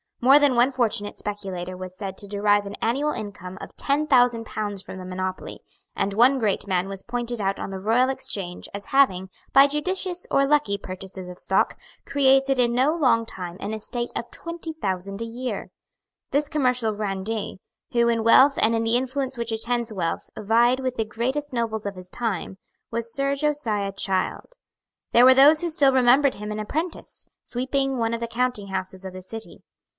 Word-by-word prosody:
More 265 +4 +7
than 285 -3 +3
one 245 +3 +4
fortunate 225 -5 -1
speculator 190 -3 -5
was 185 0 -8
said 195 -1 -6
to 205 - -6
derive 205 0 +2
an 200 - -6
annual 275 +6 +1
income 200 -6 -7
of - - -10
ten 290 +2 0
thousand 245 -4 +4
pounds 205 -3 -4
from 190 - -9
the 185 - -8
monopoly; 185 0 -5 0.3
and 200 - -1
one 245 +6 +5
great 210 -3 0
man 185 -1 0
was 195 -1 -3
pointed 240 -1 -4
out 195 0 -1
on - - -4
the 190 - -5
Royal 230 +6 +2
Exchange 190 -8 -4
as 200 0 -6
having, 190 -10 +3 0.2
by 275 - +8
judicious 360 +5 -2
or 275 0 +3
lucky 290 -9 +2
purchases 185 -1 -8
of 180 0 -9
stock, 190 - +1 0.3
created 270 -1 +3
in 240 -1 +3
no 265 +6 +2
long 250 -8 +3
time 180 -3 -7
an 210 - -4
estate 240 +3 -4
of 235 - -4
twenty 335 -1 -6
thousand 195 - -3
a - - -2
year. 245 +2 -5 0.6
This 290 +1 0
commercial 250 -7 +1
grandee, 205 0 -3 0.3
who 235 -1 +3
in 230 -1 +1
wealth 265 +5 +6
and 230 +1 +3
in 225 - 0
the 230 +1 +3
influence 265 +1 -2
which 235 -1 -2
attends 235 0 -2
wealth 170 -4 -3
vied 235 +4 +3
with 255 -1 -3
the 225 - 0
greatest 260 +7 -2
nobles 225 -3 -2
of 200 -1 -4
his 185 0 -11
time, 205 -5 -3 0.3
was 230 0 -3
Sir 275 0 0
Josiah 245 -9 0
Child. 195 - -2 0.6
There 240 +1 +7
were 260 0 +8
those 295 +4 +7
who 345 - -1
still 280 -4 +4
remembered 260 +2 +4
him 210 +1 -6
an 210 - -4
apprentice, 315 +11 -4 0.2
sweeping 265 +2 -1
one 230 -1 0
of - - -5
the 235 - -3
counting 240 -3 -1
houses 190 0 -5
of 190 - -6
the 185 - -8
City. 225 +4 -8
230 Hz, 190 wpm, -24 LUFS, 200-265 Hz, 0.6 s, by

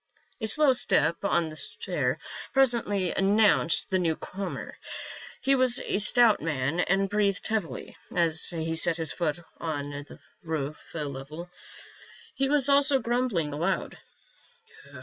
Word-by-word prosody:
A 220 - -1
slow 285 +4 +5
step 165 - +2
on 170 -5 +1
the 155 - -10
stair 145 -4 -2 0.4
presently 235 -8 +2
announced 200 -3 +2
the 185 - +2
new 165 -3 0
comer. 190 +3 -6 0.7
He 275 - +3
was 255 -2 +2
a - - -2
stout 230 +1 +5
man 150 0 -2
and 195 +2 +1
breathed 200 -1 0
heavily 190 - -3 0.2
as 165 -2 +3
he 165 -1 -3
set 165 0 +3
his 160 -2 -2
foot 170 -1 -2 0.2
on 145 -3 -4
the 145 +1 -9 0.2
roof 155 -4 -5
level. 150 +3 -6 0.8
He 270 0 0
was 285 -2 +3
also 280 0 +5
grumbling 235 - -1
aloud. 165 +6 -2
180 Hz, 130 wpm, -27 LUFS, 160-220 Hz, 0.8 s, slow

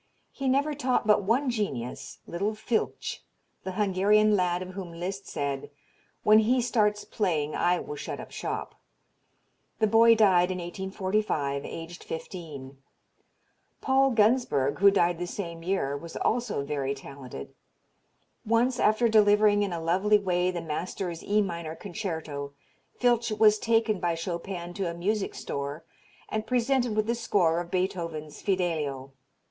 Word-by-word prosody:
He 275 -1 -2
never 285 +3 +2
taught 265 -5 0
but 210 -1 +4
one 245 +7 +1
genius, 140 - -4
little 200 +5 -2
Filtsch, 220 +1 -2 0.4
the 190 - -4
Hungarian 210 +2 +3
lad 180 -1 +1
of 185 - -9
whom 185 -2 -7
Liszt 185 +3 -5
said, 140 -1 -3 0.5
"When 215 +1 +7
he 240 +4 +3
starts 210 -4 +1
playing 160 -8 -1
I 180 +1 +2
will 150 - -6
shut - - -5
up - - -9
shop." - - -4 1.0
The 220 - +3
boy 225 +2 +6
died 190 -5 +4
in 185 - -2
1845, 185 -5 -2
aged 165 +2 -8
fifteen; 150 -6 -8 1.0
Paul 270 0 +3
Gunsberg, 210 - +2
who 200 +1 +8
died 175 -3 +2
the 175 - -3
same 170 -3 -6
year, 165 -6 -1
was 165 +3 -8
also 235 -10 0
very 140 -1 -2
talented. 135 - -9 0.9
Once 240 +3 +2
after 215 +3 +3
delivering 210 -1 +5
in 200 -2 0
a 170 - -3
lovely 190 +6 +3
way 180 -2 0
the 175 -2 -3
master's 170 +2 -4
E 210 +1 +2
minor 170 -4 -5
concerto 160 -8 -5 0.5
Filtsch 240 -3 +2
was 215 -1 +5
taken 225 -3 +2
by 170 -1 0
Chopin 175 +1 -5
to 185 -1 -2
a 170 - -5
music 200 +4 -1
store 140 +3 -5 0.4
and 215 0 -3
presented 250 -2 +1
with 215 0 +1
the 230 - +1
score 180 -8 +1
of 175 0 -5
Beethoven's 170 -5 -3
"Fidelio." 155 -8 -1
190 Hz, 145 wpm, -27 LUFS, 165-215 Hz, 1.0 s, who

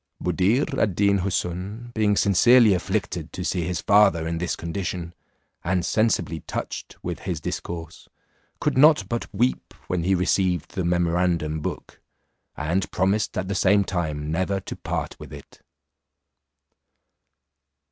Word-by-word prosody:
Buddir 95 - +1
ad 100 -5 +1
Deen 100 0 +3
Houssun 100 +5 -3
being 105 -2 +2
sincerely 110 +3 +5
afflicted 90 - -2
to - - -4
see 85 -3 -1
his 90 -5 -2
father 100 -6 +4
in 85 0 -2
this 90 -1 -1
condition, 85 0 -4 0.5
and 90 0 0
sensibly 100 -8 +1
touched - - -6
with - - -4
his - - -4
discourse, 85 -2 -6 0.5
could - - 0
not 150 -9 +6
but 120 +2 -4
weep 120 +5 -1
when 90 -2 -1
he 95 +3 +2
received 90 -2 0
the 95 - -3
memorandum 85 -2 +1
book, - - -6 0.6
and 85 +6 -1
promised 100 +3 0
at 95 0 -2
the 100 - -2
same 100 +1 +3
time 75 -5 -3
never 95 +4 0
to - - -7
part - - -4
with - - -10
it. - - -13
95 Hz, 135 wpm, -24 LUFS, 85-100 Hz, 0.6 s, not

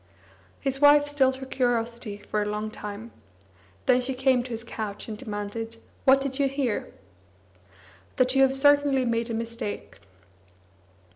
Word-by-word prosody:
His 270 0 -2
wife 290 0 +7
stilled 270 -3 +2
her 265 0 -8
curiosity 235 -4 -1
for 210 +1 -3
a - - -1
long 210 +1 -3
time; 210 +2 -8 0.7
then 250 0 +4
she 255 +1 -2
came 260 -1 +3
to 250 - -8
his 230 -1 -3
couch 215 -3 -6
and 220 - -5
demanded: 210 +2 -5 0.3
"What 270 +1 +7
did 270 0 -3
you 280 - +3
hear?" 270 -5 -2 1.2
"That 255 0 +3
you 270 - +4
have 270 0 +4
certainly 285 -2 +4
made 230 0 -1
a 230 - -2
mistake." 230 -2 -5
245 Hz, 150 wpm, -26 LUFS, 225-270 Hz, 1.2 s, wife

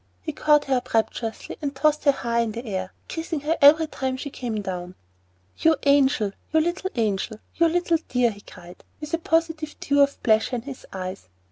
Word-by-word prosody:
He 310 - -5
caught 295 0 +3
her 265 -2 +2
up 245 - -4
rapturously 225 0 -2
and 285 -2 -3
tossed 300 +2 +1
her 285 - +7
high 235 -3 -1
in 230 -1 -1
air, 190 -6 -4 0.2
kissing 325 -2 -4
her 310 +3 0
every 310 +3 +7
time 265 -4 -3
she 285 +1 -6
came 235 -5 -4
down. 180 -1 -5 0.6
"You 320 0 +4
angel! 275 -7 +3 0.2
you 315 - +4
little 345 +4 -1
angel! 215 -1 -1 0.2
you 335 - +3
little 340 0 +2
dear!" 245 -2 +2
he 205 -1 -12
cried, 180 -3 -14 0.2
with 300 +1 -8
a 330 - +1
positive 325 -2 0
dew 285 0 +2
of 280 0 +1
pleasure 220 +2 +3
in 235 - -4
his 270 -1 -9
eyes. 185 - -6
270 Hz, 195 wpm, -24 LUFS, 220-310 Hz, 0.6 s, her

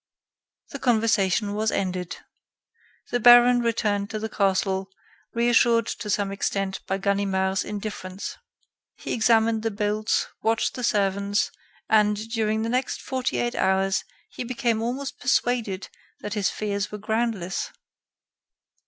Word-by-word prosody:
The 280 - -6
conversation 215 -5 +2
was 215 +1 0
ended. 180 -2 -2 0.9
The 245 - +1
baron 245 +1 +8
returned 215 -3 0
to 220 - -3
the 220 +1 -4
castle, 195 -1 0 0.5
reassured 235 -1 +4
to 215 - -5
some 200 -1 0
extent 195 -1 -2
by 190 - 0
Ganimard's 195 -1 0
indifference. 205 -2 -6 0.6
He - - -5
examined 225 -1 +3
the 225 - 0
bolts, 210 +1 0 0.2
watched 225 0 +1
the 250 - -6
servants, 200 -2 +1 0.4
and, 210 -1 +4
during 220 -1 0
the - - -1
next 255 +2 -1
forty 260 -1 -2
eight 240 0 0
hours, 190 0 +1 0.3
he - - -5
became 235 -2 -1
almost 260 +4 -3
persuaded 240 -6 0 0.3
that 210 - -4
his 205 -3 +1
fears 205 -1 -3
were 210 - -5
groundless. 215 -3 -2
215 Hz, 125 wpm, -25 LUFS, 195-230 Hz, 0.9 s, baron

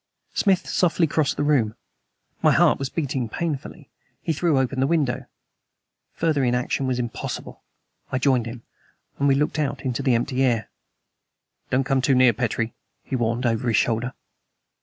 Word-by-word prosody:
Smith 195 -3 +2
softly 175 -1 +2
crossed 155 -2 0
the - - 0
room. 125 -8 +2 0.7
My - - +5
heart - - +4
was 135 -1 -2
beating 135 -7 -2
painfully. 155 +1 -5 0.3
He 165 - -1
threw 155 -1 +1
open 130 0 0
the 135 - +3
window. 150 -6 0 0.9
Further 155 -4 +1
inaction 125 +2 0
was 130 -1 0
impossible. 120 -2 -5 0.5
I 130 - +1
joined 125 -3 +2
him; 115 0 -8 0.6
and 140 - +3
we 135 - +4
looked 150 +2 0
out 145 -3 -1
into 125 -3 -1
the 130 -4 +3
empty 130 +3 0
air. 120 -4 +1 1.0
"Don't 130 +1 +2
come 135 -1 +1
too 135 0 +3
near, 125 -2 +6
Petrie!" 115 0 -1 0.3
he 135 - -3
warned 120 +1 0
over 115 +1 0
his 115 -3 +3
shoulder. 120 +2 0
130 Hz, 160 wpm, -24 LUFS, 120-145 Hz, 1.0 s, near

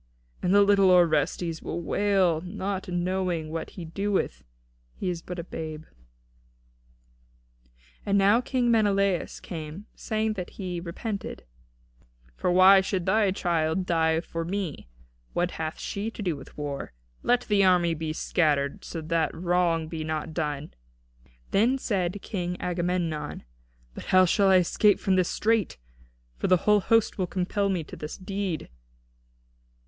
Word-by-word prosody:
And 180 - +1
the 205 +1 +6
little 200 -1 +5
Orestes 170 -1 +2
will - - -4
wail, 185 -2 +1
not 195 +1 -4
knowing 175 -2 -1
what 165 0 -4
he 175 - -5
doeth, 195 - -1
seeing - - -28 0.5
he 185 - -3
is 170 -1 -5
but 180 +1 -7
a 170 - -4
babe." 155 -2 -6 2.2
And 200 0 +1
now 200 +4 +5
King 250 -1 +1
Menelaus 200 -4 +1
came, 160 +3 -7
saying 220 0 -1
that 180 -4 -5
he 180 -3 -4
repented, 195 +5 -5 0.9
"For - - -1
why 190 +2 +7
should 190 -2 -2
thy 210 +1 +3
child 175 -2 0
die 160 -2 +2
for 165 -1 -5
me? 175 - -4 0.4
What 175 +1 0
hath 160 0 -4
she 205 +3 -3
to 225 - -7
do 175 -5 0
with 135 - -13
war? 145 - -5 0.3
Let 245 0 +2
the 205 -4 +2
army 180 -2 +4
be 160 0 -3
scattered, 145 -3 0
so 165 - -6
that 165 0 0
wrong 170 -2 +1
be 160 -1 -5
not 155 +1 -3
done." 150 0 -3 0.8
Then 235 +7 +3
said 195 -6 -1
King 180 -3 -3
Agamemnon: 175 -4 -2 0.5
"But - - -9
how 185 0 +5
shall 195 +3 +3
I 190 - +6
escape 185 +3 +4
from 190 - +1
this 185 -1 +2
strait? 220 - +1 0.6
For - - -1
the 185 - +5
whole 210 0 +5
host 225 +1 +2
will 185 - 0
compel 195 +2 -1
me 180 -4 -1
to - - -10
this 150 +1 -7
deed?" 195 -3 -3
180 Hz, 150 wpm, -27 LUFS, 165-200 Hz, 2.2 s, why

